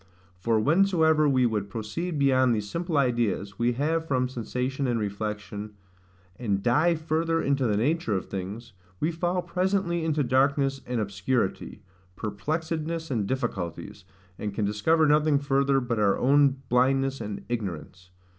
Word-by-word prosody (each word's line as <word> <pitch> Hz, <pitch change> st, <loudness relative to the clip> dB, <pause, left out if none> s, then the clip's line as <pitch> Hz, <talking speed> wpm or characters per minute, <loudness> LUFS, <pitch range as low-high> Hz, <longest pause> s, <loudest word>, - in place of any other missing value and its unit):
For 110 Hz, +3 st, +1 dB
whensoever 160 Hz, -, +3 dB
we 130 Hz, -2 st, +3 dB
would 105 Hz, -4 st, -1 dB
proceed 145 Hz, -, -4 dB
beyond 130 Hz, -3 st, +3 dB
these 105 Hz, -1 st, -3 dB
simple 170 Hz, -, -2 dB
ideas 120 Hz, -7 st, 0 dB
we 120 Hz, +1 st, +2 dB
have 160 Hz, +5 st, -1 dB
from 130 Hz, -3 st, +1 dB
sensation 125 Hz, +3 st, -3 dB
and 120 Hz, -2 st, 0 dB
reflection 105 Hz, 0 st, -4 dB, 0.6 s
and 100 Hz, -5 st, -1 dB
dive 155 Hz, +7 st, +3 dB
further 165 Hz, +1 st, 0 dB
into 140 Hz, -4 st, +1 dB
the 105 Hz, -2 st, +1 dB
nature 135 Hz, -1 st, 0 dB
of 95 Hz, -, -2 dB
things, 100 Hz, +5 st, -6 dB, 0.3 s
we 160 Hz, -, 0 dB
fall 175 Hz, +2 st, -1 dB
presently 185 Hz, -2 st, 0 dB
into 155 Hz, -2 st, +1 dB
darkness 135 Hz, +1 st, +2 dB
and 125 Hz, -1 st, -1 dB
obscurity, 100 Hz, 0 st, -2 dB, 0.3 s
perplexedness 160 Hz, -, -3 dB
and 110 Hz, -6 st, 0 dB
difficulties, 105 Hz, -13 st, -4 dB, 0.4 s
and 105 Hz, -2 st, -4 dB
can 105 Hz, -, 0 dB
discover 155 Hz, +11 st, +2 dB
nothing 150 Hz, 0 st, +4 dB
further 140 Hz, -1 st, +2 dB
but 120 Hz, -3 st, -2 dB
our 100 Hz, -2 st, +3 dB
own 140 Hz, 0 st, +3 dB
blindness 135 Hz, +1 st, +2 dB
and 105 Hz, -2 st, -6 dB
ignorance. 90 Hz, -5 st, -5 dB
130 Hz, 145 wpm, -26 LUFS, 105-155 Hz, 0.6 s, nothing